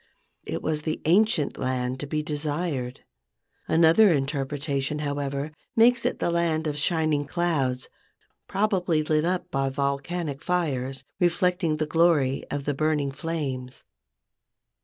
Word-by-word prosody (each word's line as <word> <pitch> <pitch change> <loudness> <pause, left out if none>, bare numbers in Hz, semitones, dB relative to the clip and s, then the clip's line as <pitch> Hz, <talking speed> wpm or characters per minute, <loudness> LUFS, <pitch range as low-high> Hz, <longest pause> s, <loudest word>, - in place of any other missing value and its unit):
It - - -3
was 155 -1 0
the 155 0 -2
ancient 180 -2 +3
land 130 0 -1
to 145 - -5
be 150 +1 -1
desired. 150 -3 -3 0.7
Another 170 +6 +6
interpretation, 140 0 -1
however, 145 0 -3 0.2
makes 235 +1 +5
it - - -2
the - - 0
land 165 -2 +1
of 150 -1 -2
shining 155 -2 +1
clouds, 145 -7 0 0.6
probably 190 -6 +1
lit 155 +1 +1
up 180 +1 -1
by 135 0 0
volcanic 140 +2 -2
fires, 135 -7 -1 0.2
reflecting 175 -2 +1
the 155 - 0
glory 150 -4 +2
of 140 -1 -3
the 145 - 0
burning 150 -1 0
flames. 135 -4 -4
150 Hz, 125 wpm, -26 LUFS, 140-170 Hz, 0.7 s, Another